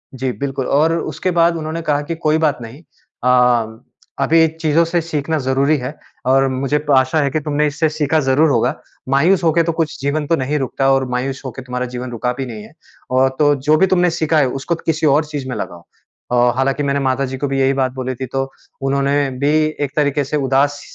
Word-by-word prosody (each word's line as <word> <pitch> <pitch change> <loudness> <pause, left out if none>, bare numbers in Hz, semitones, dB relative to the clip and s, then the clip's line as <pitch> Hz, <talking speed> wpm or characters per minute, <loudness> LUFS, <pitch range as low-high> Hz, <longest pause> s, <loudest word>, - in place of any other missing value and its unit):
जी, 130 0 -2
बिल्कुल 135 -1 -4
और 155 +4 +3
उसके 160 +5 -3
बाद 170 0 +4
उन्होंने 160 +1 -4
कहा 145 -2 +1
कि, 165 +2 -4
"कोई 155 -1 +1
बात 155 -3 +1
नहीं। 120 +7 -10 0.4
अ, 125 -3 +2 0.4
अभी 160 0 +4
चीज़ों 160 +1 +3
से 170 0 0
सीखना 160 -1 -2
ज़रूरी 140 +3 +2
है 130 +3 -5 0.3
और 135 +1 +4
मुझे 140 +3 -1
आशा 130 +4 +2
है 140 - +1
कि 155 - 0
तुमने 150 0 0
इससे 155 +2 0
सीखा 155 0 0
ज़रूर 135 +4 +3
होगा। - - +1 0.3
मायूस 170 +7 +3
हो 165 - +4
के 170 0 +3
तो 165 - 0
कुछ 160 -1 -1
जीवन 145 +1 -1
तो 165 - +3
नहीं 140 +3 -1
रुकता 135 +1 0
और 135 0 +1
मायूस 130 +2 -2
होके 130 0 -6
तुम्हारा 125 0 -3
जीवन 125 0 -5
रुका 125 +1 -2
भी 135 - -2
नहीं 110 -3 -8
है 110 - -15 0.4
और 130 +1 +3
तो 145 -1 +4
जो 145 +3 +2
भी 190 +4 +4
तुमने 180 0 +3
सीखा 160 -1 0
है, 135 - +3
उसको 135 +6 -2
किसी 160 -1 -2
और 155 +1 +2
चीज़ 145 -3 -5
में 125 - -3
लगाओ।" 85 -1 -6 0.5
अ, 120 0 +4
हालाँकि 135 +2 0
मैंने 140 0 0
माताजी 130 0 -1
को 145 - -2
भी 135 0 -1
यही 135 +1 +3
बात 130 -1 +1
बोली 130 -1 -4
थी, 130 - -5
तो 135 +1 -3 0.3
उन्होंने 140 +1 +1
भी 145 +2 +2 0.3
एक 140 - -8
तरीके 145 -1 +1
से 150 +2 -1
उदास 140 +1 +1
140 Hz, 220 wpm, -18 LUFS, 130-155 Hz, 0.5 s, बाद